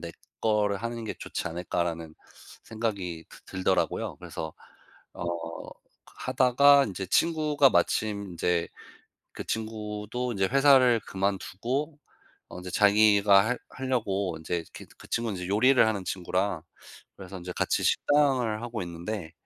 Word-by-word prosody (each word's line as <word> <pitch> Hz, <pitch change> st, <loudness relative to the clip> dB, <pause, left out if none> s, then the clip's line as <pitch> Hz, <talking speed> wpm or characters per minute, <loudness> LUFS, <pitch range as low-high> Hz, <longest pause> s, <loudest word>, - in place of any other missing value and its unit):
내 85 Hz, 0 st, -6 dB, 0.3 s
거를 105 Hz, -2 st, +1 dB
하는 115 Hz, 0 st, -5 dB
게 110 Hz, -, -3 dB
좋지 -, -, -5 dB
않을까'라는 85 Hz, -1 st, -3 dB, 0.5 s
생각이 100 Hz, -8 st, -4 dB
드 -, -, -15 dB, 0.2 s
들더라고요. 95 Hz, 0 st, 0 dB
그래서 80 Hz, -1 st, -7 dB, 0.6 s
어 -, -, -6 dB, 0.9 s
하다가 140 Hz, +3 st, +4 dB
인제 95 Hz, -2 st, -5 dB
친구가 150 Hz, -, +3 dB
마침 105 Hz, -4 st, +1 dB
인제 85 Hz, 0 st, 0 dB, 0.6 s
그 -, -, -7 dB
친구도 110 Hz, +2 st, -4 dB
인제 95 Hz, -3 st, +1 dB
회사를 135 Hz, -2 st, +5 dB
그만두고 110 Hz, +10 st, -2 dB, 0.5 s
어 -, -, -10 dB
인제 90 Hz, 0 st, -7 dB
자기가 105 Hz, -1 st, +5 dB
할 125 Hz, 0 st, -1 dB
하려고 100 Hz, -9 st, -2 dB
인제 85 Hz, +1 st, -3 dB
그 -, -, -10 dB
그 -, -, -14 dB
친구는 115 Hz, -5 st, -2 dB
인제 90 Hz, -, -4 dB
요리를 120 Hz, +6 st, +4 dB
하는 105 Hz, -4 st, -1 dB
친구라 90 Hz, -1 st, -1 dB, 0.5 s
그래서 95 Hz, 0 st, -9 dB
인제 90 Hz, 0 st, -7 dB
같이 -, -, 0 dB
식당을 130 Hz, -7 st, +2 dB
하고 120 Hz, -3 st, -4 dB
있는데 85 Hz, 0 st, -6 dB
105 Hz, 285 characters per minute, -27 LUFS, 90-120 Hz, 0.9 s, 회사를